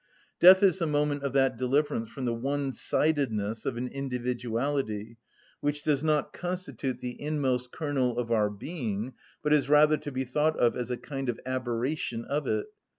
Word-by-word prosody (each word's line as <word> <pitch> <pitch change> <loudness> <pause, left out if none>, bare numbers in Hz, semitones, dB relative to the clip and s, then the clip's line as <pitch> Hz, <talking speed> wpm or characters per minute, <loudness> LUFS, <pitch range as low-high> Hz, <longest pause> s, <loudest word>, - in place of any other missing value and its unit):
(33) 175 - +6
Death 190 +2 +8
is 190 -2 +5
the 165 - 0
moment 145 -1 +1
of 140 -1 -2
that 135 -3 +3
deliverance 130 -2 0
from 130 +2 -5
the 120 - 0
one‐sidedness 135 -3 0
of 120 - -2
an 125 +1 -2
individuality 125 -3 -2 0.4
which 145 0 -1
does 150 -2 +1
not 155 -1 +1
constitute 175 -8 -4
the 125 0 -6
inmost 130 -5 -1
kernel 135 -6 -1
of 120 -1 -2
our 105 -2 +3
being, 115 - -4 0.3
but 150 - +3
is 145 -2 +2
rather 150 +1 +6
to 145 - -7
be 130 0 -2
thought 150 +5 +1
of 120 - +3
as 125 -1 -3
a 125 - -2
kind 135 -1 -5
of 120 - -2
aberration 125 -1 -2
of 145 +1 -2
it. - - 0
135 Hz, 175 wpm, -28 LUFS, 120-150 Hz, 0.4 s, Death